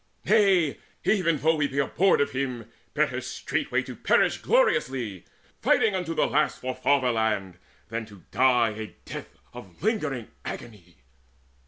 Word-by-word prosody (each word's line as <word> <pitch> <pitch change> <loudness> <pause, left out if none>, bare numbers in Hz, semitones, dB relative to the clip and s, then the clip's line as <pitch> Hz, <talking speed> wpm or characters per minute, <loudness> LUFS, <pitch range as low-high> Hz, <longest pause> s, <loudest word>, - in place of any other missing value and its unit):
Nay, 195 -7 +3 0.2
even 170 -6 +2
though 160 +3 +2
we 145 -2 +1
be 135 0 -7
abhorred 155 +7 +3
of 140 - 0
him, 130 -4 -3 0.3
Better - - +1
straightway - - -2
to - - -8
perish - - +2
gloriously 130 - +1 0.4
Fighting 215 - +3
unto 180 -3 -2
the - - +3
last 150 +1 +1
for 130 0 -3
fatherland, 110 -8 +1 0.3
Than 110 -4 -7
die 125 -3 +4
a 110 0 -6 0.2
death - - -8 0.2
of 115 - -12
lingering 155 - -1
agony!" 90 - -9
130 Hz, 135 wpm, -26 LUFS, 110-160 Hz, 0.4 s, die